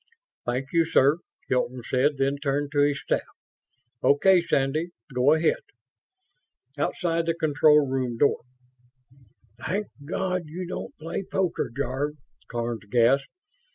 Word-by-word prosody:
"Thank 130 +3 -2
you, 165 0 +5
sir," 155 -1 +3 0.3
Hilton 125 -1 -1
said, 140 +3 +2
then 135 +1 +1
turned 140 0 -1
to 145 - 0
his 145 -1 +3
staff. - - 0 0.8
"Okay, 180 +6 +5
Sandy, 155 +2 0 0.2
go 125 +4 +4
ahead." 160 +1 +2 1.2
Outside 165 -2 -1
the 165 - +1
control 150 -2 +4
room 130 -3 -2
door, 145 - +3 1.2
"Thank 205 +4 -2
God 185 +2 -2
you 175 +4 -5
don't 180 - -6
play 165 +4 -4
poker, 190 -7 -1
Jarve!" 140 +2 -2 0.3
Karns 115 -3 -4
gasped. 125 +5 +3
145 Hz, 120 wpm, -26 LUFS, 135-165 Hz, 1.2 s, you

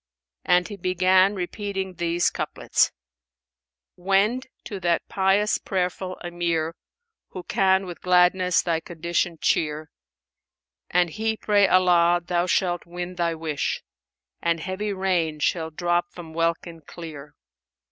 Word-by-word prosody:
And 180 0 +3
he 205 - -8
began 185 +2 +3
repeating 190 +1 -4
these 175 0 0
couplets, - - 0 1.0
"Wend 200 +8 +1 0.2
to 200 -4 -6
that 170 -2 0
pious 195 +2 +2
prayerful 185 -1 -2
Emir, 170 -2 -1 0.3
* 460 -1 -60
Who 185 - -6
can 190 +1 +2
with 175 -2 -8
gladness 180 0 +3
thy 165 -2 0
condition 170 +1 -2
cheer; 155 0 0 1.0
An 175 -1 +2
he 220 +4 -2
pray 205 -2 +3
Allah, 175 -2 +4
thou 175 0 0
shalt 175 -2 0
win 175 +1 -5
thy 170 -2 -1
wish; 155 -3 -2 0.3
* 60 - -58
And 170 -1 +1
heavy 190 +4 -3
rain 180 -5 0
shall 160 +2 0
drop 175 +2 -1
from 165 -3 -10
welkin 165 0 -2
clear. 150 -2 -10
175 Hz, 125 wpm, -24 LUFS, 170-190 Hz, 1.0 s, Allah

